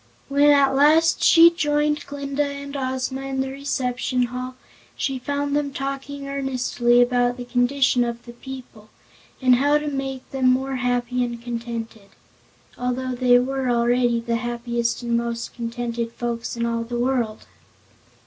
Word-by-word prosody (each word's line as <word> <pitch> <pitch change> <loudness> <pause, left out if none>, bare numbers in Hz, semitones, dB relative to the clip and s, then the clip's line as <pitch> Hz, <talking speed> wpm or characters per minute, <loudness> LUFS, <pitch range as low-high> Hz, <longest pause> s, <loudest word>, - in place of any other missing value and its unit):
When 285 +1 +4
at 280 -2 +5
last 305 +4 +4
she 335 0 +8
joined 295 -2 0
Glinda 280 0 -3
and 280 0 -6
Ozma 260 0 -2
in 270 0 -4
the 265 0 -3
reception 255 -2 -1
hall, 250 +1 -4 0.4
she 270 -2 -2
found 285 +2 -2
them 290 -1 0
talking 275 +1 -5
earnestly 255 -3 +2
about 245 0 +1
the 245 - -6
condition 245 +1 +2
of 235 0 -4
the 240 - -10
people, 240 -4 -11 0.5
and 250 -1 +6
how 290 +3 +3
to 300 0 -4
make 270 -2 -4
them 260 -1 +2
more 265 +1 +1
happy 245 0 0
and 240 -1 -4
contented 230 -3 -6 0.7
although 250 +1 -2
they 245 0 +4
were 260 +1 -1
already 240 0 +2
the 230 0 -1
happiest 235 0 -2
and 235 0 0
most 235 0 -3
contented 235 0 -4
folks 235 0 -4
in 235 - 0
all 230 0 -1
the 240 +1 -4
world. 240 -3 -1
255 Hz, 150 wpm, -23 LUFS, 240-275 Hz, 0.7 s, she